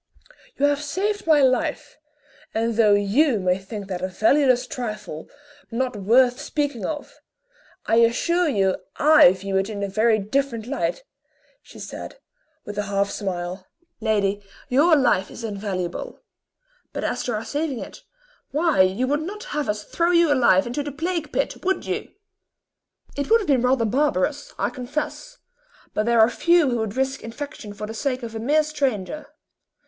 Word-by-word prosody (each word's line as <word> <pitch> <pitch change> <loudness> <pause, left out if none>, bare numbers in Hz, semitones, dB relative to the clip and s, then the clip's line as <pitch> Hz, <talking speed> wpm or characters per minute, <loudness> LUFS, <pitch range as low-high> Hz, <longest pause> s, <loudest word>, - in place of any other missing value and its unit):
"You 285 - +3
have 290 0 +1
saved 405 +6 -2
my 305 -3 +5
life; 255 -1 0 0.6
and 230 +1 0
though 215 -2 +5
you 215 +5 +2
may 185 0 +1
think 200 +1 -7
that 185 -2 -4
a 185 - -1
valueless 250 +6 +3
trifle, 215 -11 -6 0.4
not 250 +1 -2
worth 245 +5 +3
speaking 290 -8 -2
of, 295 -2 -6 0.7
I 225 - +2
assure 330 +10 +3
you 195 -7 +1 0.2
I 305 - +7
view 195 +1 -3
it 195 +2 0
in 205 -2 -4
a - - 0
very 220 +3 +2
different 230 +2 -1
light," 285 - -2 0.6
she - - -15
said, - - -8 0.5
with 205 0 -5
a 205 -1 -3
half 200 0 0
smile. 185 -2 -4 0.3
"Lady, 205 -2 0 0.3
your 310 +6 +5
life 240 -9 +2
is 230 - -10
invaluable; 195 -5 -4 0.7
but - - -4
as - - -1
to 245 - -1
our 215 - -4
saving 290 -2 -2
it, - - -9 0.5
why, 305 - +2
you 190 +7 +2
would 290 +3 0
not 410 +6 -6
have 295 -4 -2
us 210 0 -2
throw 340 +8 0
you 340 -4 +4
alive 235 -8 +4
into 245 +5 -3
the 290 0 -5
plague 325 +1 -3
pit, - - -2
would 380 +1 0
you?" - - -3 1.1
"It 285 +5 -3
would 455 +1 +6
have 405 - -5
been 270 -4 +3
rather 250 -1 +2
barbarous, 280 +2 0
I - - -1
confess, 300 - -5 0.6
but 215 +1 -1
there 235 -1 +3
are 220 - +7
few 340 +2 +3
who 240 - 0
would 220 +1 -3
risk 265 0 -1
infection 230 -2 -7
for 210 - -5
the 220 - -7
sake 255 +2 -2
of 230 -1 -6
a 225 - -4
mere 295 +7 +3
stranger. 285 -2 -2
245 Hz, 170 wpm, -23 LUFS, 205-290 Hz, 1.1 s, I